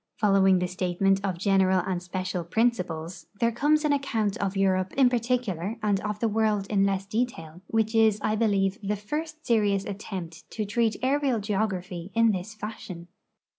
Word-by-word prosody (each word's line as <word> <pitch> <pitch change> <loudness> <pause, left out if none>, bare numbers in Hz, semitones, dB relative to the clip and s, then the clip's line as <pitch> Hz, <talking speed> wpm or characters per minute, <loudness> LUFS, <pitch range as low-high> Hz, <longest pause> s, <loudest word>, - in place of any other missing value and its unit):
Following 195 -3 +4
the 180 0 0
statement 185 +2 0
of 190 -3 -1
general 190 -1 +3
and 185 -2 -2
special 185 0 -3
principles, 175 -5 -1
there 230 0 +2
comes 300 +6 +2
an 295 - +3
account 225 -8 0
of 195 -1 -2
Europe 185 -1 +1
in 265 -2 +5
particular 230 -6 -1
and 205 -2 +2
of 210 +1 -4
the 230 - +1
world 215 -2 +1
in 200 -1 +3
less 195 0 -1
detail, 195 -7 -3
which 220 0 0
is, 220 -2 +4
I 215 - +1
believe, 200 -3 +1
the 205 +1 -1
first 305 +9 -5
serious 205 -4 +2
attempt 185 -5 -7
to 215 - -2
treat 220 +1 +1
areal 270 -2 +1
geography 195 -4 -2
in 230 -1 +5
this 200 +3 -5
fashion. 190 -5 -8
200 Hz, 170 wpm, -26 LUFS, 185-225 Hz, -, in